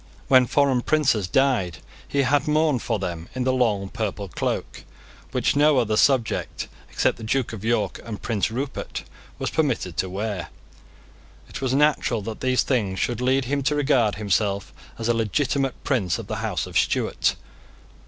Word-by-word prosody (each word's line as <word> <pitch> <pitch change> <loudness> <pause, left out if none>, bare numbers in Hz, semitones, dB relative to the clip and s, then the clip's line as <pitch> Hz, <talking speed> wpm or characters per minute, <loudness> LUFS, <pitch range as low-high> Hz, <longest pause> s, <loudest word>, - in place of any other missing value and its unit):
When 130 -2 +6
foreign 135 -3 +3
princes 130 -10 +2
died, 115 -7 +1 0.3
he 140 -1 +1
had 145 +2 +2
mourned 150 -4 +2
for 115 - -1
them 85 -4 -5
in 130 - -1
the 130 0 +2
long 110 -6 +1
purple 100 -1 -3
cloak, - - -3 0.5
which - - +1
no 145 0 +5
other 110 -4 +2
subject, 125 0 +1 0.2
except - - +1
the - - -10
Duke 120 +2 0
of 105 -2 -7
York 110 -3 0
and 110 -3 -6
Prince 110 -3 -1
Rupert, 130 +4 -4 0.3
was - - -3
permitted 125 - 0
to 95 - 0
wear. 100 0 -3 1.0
It - - -8
was 130 -1 0
natural 140 -6 +2
that 110 +1 -6
these 130 -1 +2
things 105 -8 0
should 120 -1 -1
lead 130 +1 +2
him 140 +3 0
to 150 +2 +1
regard 135 -7 +2
himself 100 -1 0 0.2
as 115 - -3
a 120 - +3
legitimate 135 +4 0
prince 105 - 0
of - - -7
the - - -4
House - - -2
of - - +1
Stuart. - - +1
120 Hz, 170 wpm, -24 LUFS, 105-135 Hz, 1.0 s, When